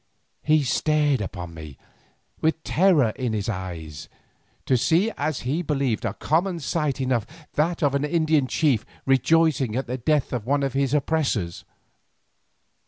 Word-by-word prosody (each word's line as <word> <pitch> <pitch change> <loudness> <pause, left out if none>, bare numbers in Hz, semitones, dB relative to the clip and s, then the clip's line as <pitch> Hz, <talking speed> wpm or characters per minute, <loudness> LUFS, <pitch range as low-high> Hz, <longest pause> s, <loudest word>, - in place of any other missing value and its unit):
He 155 -1 +3
stared 145 -1 +1
upon 90 -3 -6
me, 80 -4 -10 0.6
with 160 0 0
terror 165 - +3
in 125 -4 -2
his 105 0 -2
eye, 90 -6 -4 0.8
to 130 - +3
see 170 - +2
as 150 -1 -2
he 140 +8 -1
believed 135 -8 -1
a 110 -2 -2
common 170 +3 0
sight 150 -3 -1
enough, 125 -4 0 0.3
that 165 +2 0
of 140 -2 +2
an 140 0 0
Indian 155 -2 +2
chief 130 -7 +1 0.2
rejoicing 135 -2 +2
at 130 - -1
the 125 +2 -4
death 150 +2 +1
of 120 -4 -2
one 140 +4 0
of 135 -2 -1
his 135 0 +1
oppressors. 135 - -1
140 Hz, 150 wpm, -24 LUFS, 120-155 Hz, 0.8 s, He